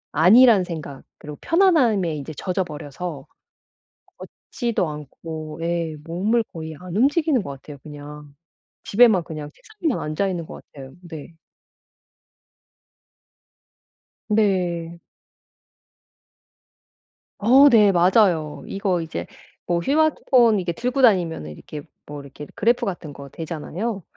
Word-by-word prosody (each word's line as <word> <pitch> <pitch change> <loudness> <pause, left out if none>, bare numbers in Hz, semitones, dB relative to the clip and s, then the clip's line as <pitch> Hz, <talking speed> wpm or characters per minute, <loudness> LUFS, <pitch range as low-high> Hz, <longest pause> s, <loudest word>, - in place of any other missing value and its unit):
안일한 205 - +6
생각 155 -6 -7 0.2
그리고 150 -1 -10
편안함에 255 - +2
인제 145 +2 -7
젖어버려서 175 -3 -5 0.9
걷지도 235 -7 -4
않고 155 +1 -8
예 170 -2 -2
몸을 205 +8 0
거의 160 -2 -7
안 180 -1 -9
움직이는 285 +1 +2
것 140 - -7
같아요, 140 +1 -10
그냥. 150 -1 -11 0.5
집에만 215 -4 +4
그냥 155 -2 -7
책상에만 360 - -4
앉아있는 170 +2 -2
것 - - -11
같아요. 135 -2 -11
네. 160 -1 -10 2.9
네. 180 -6 0 2.4
어 260 +7 +6
네. 210 -5 +5
맞아요. 175 -4 +2
이거 195 -3 -1
이제 155 - -5 0.4
뭐 175 -1 0
스마트폰 260 - +3
이게 175 -2 -2
들고 250 +9 -2
다니면은 175 - +2
이렇게 145 - -9 0.2
뭐 145 0 -8
이렇게 140 +1 -11
그래프 235 +3 +1
같은 175 -6 -5
거 140 0 -10
되잖아요. 170 - -5
175 Hz, 245 characters per minute, -22 LUFS, 155-220 Hz, 2.9 s, 안일한